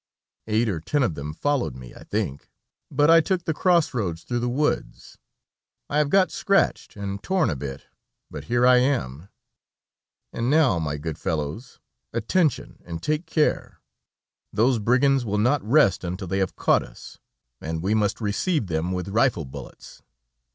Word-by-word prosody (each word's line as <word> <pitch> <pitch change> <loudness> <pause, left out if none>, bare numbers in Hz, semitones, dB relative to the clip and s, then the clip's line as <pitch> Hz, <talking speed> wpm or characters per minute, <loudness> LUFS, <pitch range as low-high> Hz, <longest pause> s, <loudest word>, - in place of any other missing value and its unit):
Eight 110 +2 +1
or 90 -7 -1
ten 145 - 0
of 110 -9 0
them 75 0 -6
followed 130 - -1
me, 60 -1 -11
I - - -13
think, 70 +1 -3 0.4
but 145 +3 +3
I 165 0 +7
took 180 +1 -1
the 160 - 0
cross 170 -1 +2
roads 90 -9 -3
through 120 -1 -2
the 120 +1 -1
woods; 145 +5 -2 0.7
I 145 - +2
have 150 -1 +2
got 190 +3 +3
scratched 195 0 0
and 100 -1 -5
torn 185 - +1
a - - -2
bit, 70 0 -7 0.5
but 70 - -7
here 120 +5 +2
I 125 0 +7
am, 100 - -1 1.0
and 115 +2 -1
now, 140 - +3
my 75 -2 -2
good 80 +1 -5
fellows, 80 - -4 0.3
attention, 135 - 0
and 85 -1 -7
take 155 +2 -1
care! 155 -2 0 0.7
Those 115 +3 +2
brigands 130 +4 +3
will 105 -2 -2
not 125 +7 +2
rest 115 -5 +3
until 90 +2 -4
they 95 +3 -1
have 95 -2 -1
caught - - +3
us, - - -12 0.4
and 80 +1 -4
we 100 +3 +1
must 105 -2 +1
receive 115 - 0
them 85 0 -2
with 90 -1 -3
rifle 110 - +1
bullets. 65 -1 -11
110 Hz, 165 wpm, -24 LUFS, -, 1.0 s, I